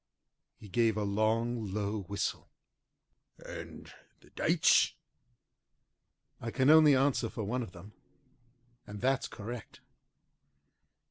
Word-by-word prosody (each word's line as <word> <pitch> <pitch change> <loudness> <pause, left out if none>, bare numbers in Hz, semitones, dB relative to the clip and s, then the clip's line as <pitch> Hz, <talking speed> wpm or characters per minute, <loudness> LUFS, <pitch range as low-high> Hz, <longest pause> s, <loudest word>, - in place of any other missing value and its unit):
He 105 - -13
gave 110 +2 +1
a 105 - 0
long, 110 +3 0
low 105 +1 -2
whistle. 100 +2 -4 0.9
"And - - -10 0.3
the - - -21
dates?" - - +3 1.4
"I 115 - -5
can 130 +5 +3
only 155 -3 +7
answer 135 +1 +1
for 110 - -5
one 125 +5 -2
of 105 -7 -7
them, 95 +5 -13 0.9
and 105 0 -8
that's 135 +3 +1
correct." 115 +1 -8
110 Hz, 110 wpm, -31 LUFS, 105-125 Hz, 1.4 s, only